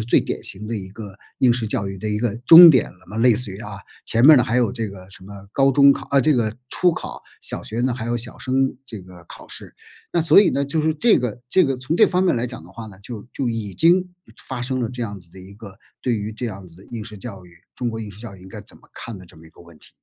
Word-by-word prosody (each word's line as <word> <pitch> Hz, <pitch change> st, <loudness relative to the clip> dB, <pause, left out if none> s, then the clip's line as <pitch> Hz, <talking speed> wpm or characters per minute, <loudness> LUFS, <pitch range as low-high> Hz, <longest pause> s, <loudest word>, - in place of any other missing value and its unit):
最 115 Hz, -, +3 dB
典 -, -, -4 dB
型 105 Hz, +3 st, -2 dB
的 115 Hz, -, -4 dB
一 95 Hz, -3 st, -6 dB
个 100 Hz, -1 st, -10 dB, 0.3 s
应 125 Hz, -2 st, +5 dB
试 120 Hz, -2 st, 0 dB
教 100 Hz, -1 st, -2 dB
育 95 Hz, -1 st, -6 dB
的 110 Hz, -, -4 dB
一 105 Hz, 0 st, -1 dB
个 115 Hz, -2 st, -1 dB
终 170 Hz, 0 st, +11 dB
点 130 Hz, -5 st, +2 dB
了 90 Hz, -, -22 dB
嘛 105 Hz, +4 st, -7 dB
类 120 Hz, -1 st, +5 dB
似 115 Hz, -1 st, +1 dB
于 95 Hz, +3 st, -9 dB
啊， 105 Hz, -, -8 dB, 0.3 s
前 115 Hz, -, +2 dB
面 155 Hz, -, +10 dB
儿 -, -, +8 dB
呢， -, -, +4 dB
还 115 Hz, +3 st, -1 dB
有 120 Hz, -2 st, +1 dB
这 115 Hz, -3 st, -4 dB
个 95 Hz, -1 st, -12 dB
什 95 Hz, -1 st, -10 dB
么 100 Hz, +1 st, -12 dB
高 135 Hz, 0 st, +3 dB
中 140 Hz, +1 st, +6 dB
考 -, -, -7 dB
啊 140 Hz, -, +4 dB
这 150 Hz, +4 st, +4 dB
个 115 Hz, -3 st, -1 dB
初 180 Hz, -, +3 dB
考， -, -, -7 dB, 0.2 s
小 -, -, -3 dB
学 115 Hz, +2 st, -4 dB
呢 130 Hz, -1 st, +1 dB
还 120 Hz, -2 st, -5 dB
有 120 Hz, 0 st, -1 dB
小 120 Hz, +1 st, -5 dB
升 135 Hz, +1 st, 0 dB
这 110 Hz, -, -8 dB
个 90 Hz, -1 st, -15 dB
考 -, -, -11 dB
试。 -, -, -6 dB, 0.4 s
那 170 Hz, -, +1 dB
所 165 Hz, +5 st, +7 dB
以 205 Hz, -, +4 dB
呢， 140 Hz, -, -1 dB
就 150 Hz, +3 st, -1 dB
是 155 Hz, 0 st, 0 dB
这 230 Hz, +8 st, +4 dB
个 120 Hz, -2 st, -4 dB
这 185 Hz, +4 st, +4 dB
个 135 Hz, -1 st, -1 dB
从 130 Hz, +6 st, -3 dB
这 -, -, +5 dB
方 180 Hz, +1 st, 0 dB
面 180 Hz, -, +2 dB
来 120 Hz, +1 st, -1 dB
讲 115 Hz, -9 st, -8 dB
的 90 Hz, -, -15 dB
话 115 Hz, +3 st, -9 dB
呢， 95 Hz, -3 st, -13 dB
就 110 Hz, +1 st, -9 dB
就 130 Hz, -3 st, -2 dB
已 110 Hz, -4 st, -5 dB
经 180 Hz, +3 st, +3 dB, 0.4 s
发 130 Hz, -2 st, -5 dB
生 130 Hz, 0 st, -2 dB
了 115 Hz, -, -1 dB
这 125 Hz, -1 st, -6 dB
样 100 Hz, -2 st, -7 dB
子 85 Hz, -1 st, -13 dB
的 95 Hz, -, -15 dB
一 95 Hz, +2 st, -13 dB
个 100 Hz, -2 st, -13 dB, 0.2 s
对 125 Hz, -, 0 dB
于 105 Hz, +1 st, -5 dB
这 120 Hz, +3 st, -5 dB
样 95 Hz, -3 st, -8 dB
子 85 Hz, -, -17 dB
的 95 Hz, -, -16 dB
应 115 Hz, -3 st, -7 dB
试 105 Hz, -2 st, -10 dB
教 100 Hz, -5 st, -9 dB
育， 85 Hz, -, -19 dB, 0.2 s
中 120 Hz, -, -2 dB
国 110 Hz, -, -6 dB
应 105 Hz, -2 st, -7 dB
试 100 Hz, +3 st, -14 dB
教 110 Hz, -5 st, -9 dB
育 95 Hz, -, -16 dB
应 95 Hz, -, -13 dB
该 105 Hz, +1 st, -9 dB
怎 105 Hz, -, -7 dB
么 -, -, -23 dB
看 115 Hz, -3 st, -8 dB
的 90 Hz, -, -13 dB
这 -, -, -16 dB
么 80 Hz, 0 st, -16 dB
一 -, -, -18 dB
个 -, -, -20 dB
问 85 Hz, -2 st, -17 dB
题。 -, -, -15 dB
115 Hz, 330 characters per minute, -21 LUFS, 100-130 Hz, 0.4 s, 终